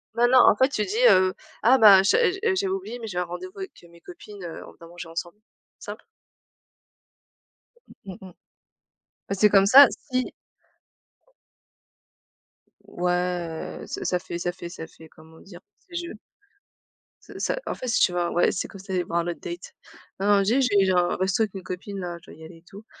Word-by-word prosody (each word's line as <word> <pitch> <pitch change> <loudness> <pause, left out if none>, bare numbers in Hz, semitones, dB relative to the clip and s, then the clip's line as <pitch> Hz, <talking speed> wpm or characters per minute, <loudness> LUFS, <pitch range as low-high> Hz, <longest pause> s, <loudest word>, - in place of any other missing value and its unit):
Bah, 240 +1 +3
non, 255 +1 +5
en 240 - +6
fait, 260 +4 +3
tu 215 -7 -2
dis, 415 - -5
heu: 185 0 +4 0.3
«Ah 255 +4 +6
ben 205 -5 +8
je 195 - +3 0.4
j'ai 390 +1 -1
oublié, 380 -10 -4
mais 225 - -7
j'ai 185 -4 -6
un - - 0
rendez-vous 370 - -9
avec, 385 -1 -6
heu, - - -16
mes 170 0 -19
copines, 210 - -12
heu, 170 -2 -8
on - - -13
va 165 - -13
manger 170 0 -10
ensemble». 170 +3 -6 0.4
Simple. - - -9 2.0
Mmh 190 -2 -8
mh 190 -1 -11 1.0
parce 195 -1 -4
que 210 - +7
comme 195 -2 +5
ça, 275 +7 +9 0.3
si 255 0 -1 2.5
Ouais, 180 -2 -3
heu, - - -8
ça - - -6
ça 180 - 0
fait 175 -1 -7
ça 175 0 -2
fait 175 -1 -9
ça 165 -2 -8
fait 160 0 -17
comment 160 +1 -18
dire? 180 -3 -14 0.2
Ça - - -37
fait, 345 - -11
je 345 0 -4 1.1
ce - - -12
ça - - -1
en - - -3
fait, 255 - -7
si 230 - +1
tu - - +4
vois? 175 -1 -1
Ouais, 175 - +2
c'est - - -3
comme 195 - -13
si 190 - -14
tu - - -6
allais 180 -1 0
voir 170 0 -2
un 170 - -3
autre 175 - -4
date. 470 +8 -8 0.5
Non 195 - -1
non, 205 -1 +4
dit: 230 +8 +2
«J'ai 205 -6 +3
genre 180 -2 +2
un - - -1
resto 190 +4 +1
avec 210 - -4
mes 190 - -7
copines, 190 +2 -7
là, 175 -2 -5
je - - -15
dois - - -15
y - - -12
aller 165 +1 -12
et 165 - -22
tout 205 +2 -13
190 Hz, 210 wpm, -24 LUFS, 175-235 Hz, 2.5 s, ça